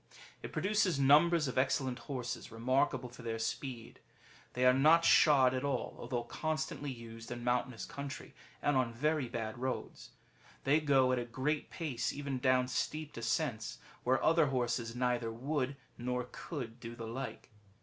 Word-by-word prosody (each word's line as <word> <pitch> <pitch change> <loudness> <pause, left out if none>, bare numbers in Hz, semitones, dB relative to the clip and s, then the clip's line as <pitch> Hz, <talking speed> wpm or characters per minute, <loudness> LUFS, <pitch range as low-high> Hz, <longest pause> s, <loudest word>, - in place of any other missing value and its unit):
^ - - -22 0.3
It - - -7
produces 185 -2 +1
numbers 150 +3 +5
of 130 - 0
excellent 130 -1 0
horses, 125 -5 -5
remarkable 125 +2 +1
for 120 +1 -12
their 115 -1 -3
speed. 115 +1 -4 0.5
They 125 +1 +1
are 125 - +7
not 155 +5 +5
shod 135 -4 +6
at 130 +1 -2
all, 140 -3 -2
although 120 -2 -2
constantly 155 +3 -3
used 115 -2 -9
in 120 -1 -5
mountainous 125 -1 0
country, 140 0 -7 0.3
and 145 - +3
on 125 -3 +1
very 150 0 0
bad 115 0 -4
roads, 130 +1 -4 0.5
[They 145 +3 +4
go 135 -4 +4
at 130 - +2
a 120 - -3
great 130 +6 -2
pace 135 -8 -2
even 140 -2 -3
down 130 -1 +3
steep 150 +4 -2
descents, 115 - -2 0.3
where 130 +1 +2
other 165 -2 +5
horses 120 -3 -1
neither 120 -2 0
would 135 +3 -2 0.2
nor 125 0 -2
could 135 -7 -6
do 120 0 -7
the 115 - -6
like. 125 +2 -6
130 Hz, 160 wpm, -34 LUFS, 120-145 Hz, 0.5 s, are